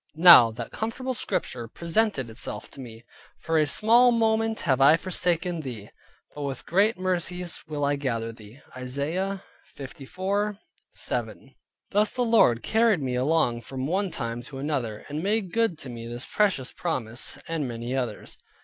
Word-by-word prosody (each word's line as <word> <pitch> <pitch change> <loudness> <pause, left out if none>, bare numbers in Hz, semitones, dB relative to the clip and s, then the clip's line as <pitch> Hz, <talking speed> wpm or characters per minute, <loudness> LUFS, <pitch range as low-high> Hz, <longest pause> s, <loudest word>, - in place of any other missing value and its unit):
Now 165 -9 +9
that 115 +1 -7
comfortable 255 +4 -3
Scripture 120 - -2
presented 170 - -1
itself 110 - -3
to - - -13
me, 115 -2 -11 0.3
"For 165 -1 0
a 155 - +2
small 235 +6 +5
moment 225 -1 +1
have 135 -5 +1
I 145 +4 +7
forsaken 175 -1 0
thee, 115 -8 -7 0.4
but 145 - -8
with 140 -2 -4
great 200 +5 +2
mercies 180 -1 -2
will 150 -2 -2
I 145 0 +1
gather 115 -5 -2
thee" 115 +4 -15
(Isaiah 155 +10 -3 0.3
54.7). 190 +10 -5 0.4
Thus 210 +1 +3
the 250 - -1
Lord 220 - +4
carried 220 -8 +2
me 130 -1 -2
along 125 -2 +1
from 130 +2 -5
one 190 +6 0
time 115 -6 -4
to 135 +2 -10
another, 135 -7 -3
and 150 +2 -4
made 200 -1 -1
good 225 -7 +1
to 135 - -7
me 115 -1 -7
this 120 +1 -6
precious 195 -12 0
promise, 120 -9 -4
and 160 -4 -2
many 120 +2 -4
others. 125 -5 -4
155 Hz, 155 wpm, -26 LUFS, 125-195 Hz, 0.4 s, Now